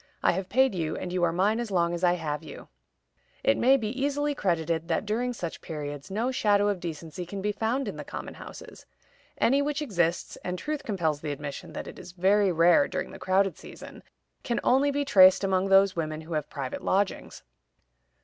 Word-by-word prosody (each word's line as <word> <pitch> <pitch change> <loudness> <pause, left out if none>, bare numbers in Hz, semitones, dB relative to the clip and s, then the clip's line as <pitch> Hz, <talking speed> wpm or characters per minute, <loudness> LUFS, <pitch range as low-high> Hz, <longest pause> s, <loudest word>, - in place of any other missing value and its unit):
I - - +5
have 185 +1 -4
paid 260 +1 +3
you, 160 -4 -2
and 180 - -5
you 180 - 0
are 170 - +3
mine 200 +6 +1
as 240 -2 -3
long 170 -3 +1
as 175 +1 -4
I 175 -1 +5
have 150 -4 -3
you." 155 - -11 0.7
It 110 - +4
may 260 +2 +4
therefore - - -7
be 225 +5 -3
easily 290 +1 0
credited 165 - -1
that - - -1
during 235 +4 -1
such 175 -9 -6
periods 145 0 -6
no 225 +6 -1
shadow 205 -4 +2
of 200 -3 -1
decency 165 0 -6
can 195 +3 -6
be 205 +2 -1
found 230 +6 -1
in - - -5
the - - -6
common - - -7
houses. - - -11 0.5
Any 275 +4 +3
which 290 0 -1
exists 175 - -1
(and 180 0 -3
truth 300 +6 -4
compels 165 - -1
the 150 - -3
admission 140 -1 -7
that - - -5
it - - -10
is 175 - -11
very 195 +2 +3
rare 175 - +5
during - - -4
the - - -10
crowded 190 +1 +1
season) - - -11 0.4
can 235 - -1
only 270 +3 +3
be 285 0 -1
traced 185 -6 +6
among 190 0 +1
those 195 0 +5
women 155 -2 -3
who 160 +1 -8
have 150 -1 -2
private 135 -3 -5
lodgings. 195 +1 -1
190 Hz, 205 wpm, -27 LUFS, 165-225 Hz, 0.7 s, traced